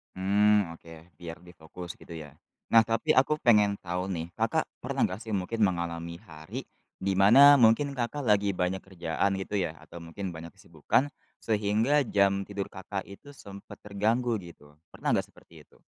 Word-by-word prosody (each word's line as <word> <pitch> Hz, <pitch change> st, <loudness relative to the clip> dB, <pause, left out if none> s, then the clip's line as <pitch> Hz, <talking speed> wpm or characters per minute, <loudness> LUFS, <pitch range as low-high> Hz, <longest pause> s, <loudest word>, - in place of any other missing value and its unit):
Mmm, 100 Hz, -2 st, +2 dB
oke, 80 Hz, -1 st, -15 dB
biar 85 Hz, +1 st, -9 dB
lebih 90 Hz, 0 st, -16 dB
fokus 85 Hz, +2 st, -9 dB
gitu -, -, -16 dB
ya? 75 Hz, -3 st, -9 dB, 0.4 s
Nah, 115 Hz, -1 st, +7 dB
tapi 115 Hz, +8 st, 0 dB
aku 150 Hz, +4 st, +3 dB
pengen 105 Hz, -4 st, +3 dB
tahu 90 Hz, +2 st, -4 dB
nih, 85 Hz, -2 st, -4 dB
Kakak -, -, 0 dB, 0.2 s
pernah -, -, 0 dB
nggak 95 Hz, +5 st, -7 dB
sih 110 Hz, -, -7 dB
mungkin 105 Hz, +3 st, -1 dB
mengalami 85 Hz, -2 st, -2 dB
hari, 80 Hz, -1 st, -8 dB, 0.3 s
di 95 Hz, 0 st, -1 dB
mana 135 Hz, +9 st, +8 dB
mungkin 135 Hz, +4 st, +3 dB
Kakak 130 Hz, +4 st, -3 dB
lagi 100 Hz, -1 st, +3 dB
banyak 90 Hz, +1 st, -2 dB
kerjaan 95 Hz, +1 st, -2 dB
gitu 100 Hz, +2 st, -5 dB
ya, 95 Hz, -, 0 dB
atau 85 Hz, -1 st, -12 dB
mungkin 90 Hz, +1 st, -6 dB
banyak 80 Hz, +1 st, -9 dB
kesibukan, 85 Hz, -, -1 dB, 0.3 s
sehingga 110 Hz, +7 st, +1 dB
jam 100 Hz, -3 st, +2 dB
tidur 100 Hz, -1 st, -5 dB
Kakak 95 Hz, +1 st, -7 dB
itu 120 Hz, +9 st, -13 dB
sempet 100 Hz, -7 st, -12 dB
terganggu 110 Hz, +4 st, 0 dB
gitu. 75 Hz, -4 st, -15 dB, 0.2 s
Pernah -, -, -1 dB
nggak -, -, -2 dB
seperti -, -, -18 dB
itu? -, -, -27 dB
100 Hz, 170 wpm, -28 LUFS, 85-110 Hz, 0.4 s, mana